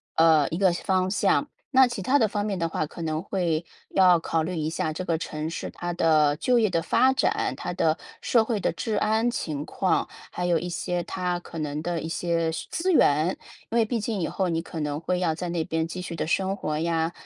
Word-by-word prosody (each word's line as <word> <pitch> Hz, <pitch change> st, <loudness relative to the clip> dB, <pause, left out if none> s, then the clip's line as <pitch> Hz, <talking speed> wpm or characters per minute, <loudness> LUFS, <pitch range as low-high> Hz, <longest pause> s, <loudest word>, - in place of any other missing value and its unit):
呃， 160 Hz, -3 st, +5 dB
一 165 Hz, -, -3 dB
个 190 Hz, -1 st, +4 dB
方 185 Hz, +1 st, 0 dB
向。 210 Hz, +8 st, +2 dB, 0.2 s
那 265 Hz, -1 st, +7 dB
其 240 Hz, -4 st, -4 dB
它 260 Hz, +9 st, +3 dB
的 230 Hz, -, +4 dB
方 205 Hz, 0 st, -2 dB
面 200 Hz, -2 st, -2 dB
的 165 Hz, -1 st, -1 dB
话， 155 Hz, -, -1 dB
可 160 Hz, -, -10 dB
能 155 Hz, -1 st, -1 dB
会 170 Hz, -4 st, -1 dB, 0.2 s
要 180 Hz, -2 st, +5 dB
考 165 Hz, 0 st, -1 dB
虑 180 Hz, +3 st, -3 dB
一 155 Hz, -1 st, -1 dB
下 160 Hz, -1 st, -2 dB
这 185 Hz, -, -4 dB
个 165 Hz, -2 st, 0 dB
城 155 Hz, -1 st, -4 dB
市， 165 Hz, -, -5 dB
它 175 Hz, 0 st, -4 dB
的 155 Hz, -3 st, +3 dB
就 245 Hz, +9 st, +2 dB
业 220 Hz, -3 st, +3 dB
的 170 Hz, -2 st, 0 dB
发 260 Hz, +10 st, +3 dB
展， 265 Hz, -, +1 dB
它 -, -, -4 dB
的 -, -, +1 dB, 0.2 s
社 230 Hz, -2 st, +3 dB
会 220 Hz, -3 st, -1 dB
的 -, -, +1 dB
治 220 Hz, -2 st, -3 dB
安 220 Hz, +3 st, +2 dB
情 150 Hz, -11 st, -3 dB
况， 190 Hz, -, 0 dB, 0.2 s
还 180 Hz, -, -3 dB
有 175 Hz, -1 st, +3 dB
一 175 Hz, +3 st, -3 dB
些 175 Hz, 0 st, -2 dB
它 180 Hz, 0 st, -2 dB
可 165 Hz, -, -8 dB
能 150 Hz, 0 st, -3 dB
的 170 Hz, +1 st, -2 dB
一 160 Hz, -, -5 dB
些 165 Hz, 0 st, 0 dB, 0.2 s
资 365 Hz, +3 st, +1 dB
源， 155 Hz, -, +4 dB, 0.4 s
因 235 Hz, -, +1 dB
为 230 Hz, -, +5 dB
毕 230 Hz, +1 st, -1 dB
竟 210 Hz, -2 st, -2 dB
以 165 Hz, -, 0 dB
后 190 Hz, -, -1 dB
你 165 Hz, -1 st, 0 dB
可 165 Hz, -1 st, -7 dB
能 150 Hz, -1 st, -2 dB
会 180 Hz, +2 st, -1 dB
要 165 Hz, -3 st, +1 dB
在 175 Hz, +2 st, -4 dB
那 170 Hz, -2 st, -1 dB
边 160 Hz, 0 st, -1 dB
继 180 Hz, +2 st, -6 dB
续 175 Hz, -2 st, -6 dB
地 -, -, -2 dB
生 190 Hz, +4 st, 0 dB
活 155 Hz, -6 st, -3 dB
呀， 165 Hz, 0 st, 0 dB
175 Hz, 255 characters per minute, -26 LUFS, 160-195 Hz, 0.4 s, 那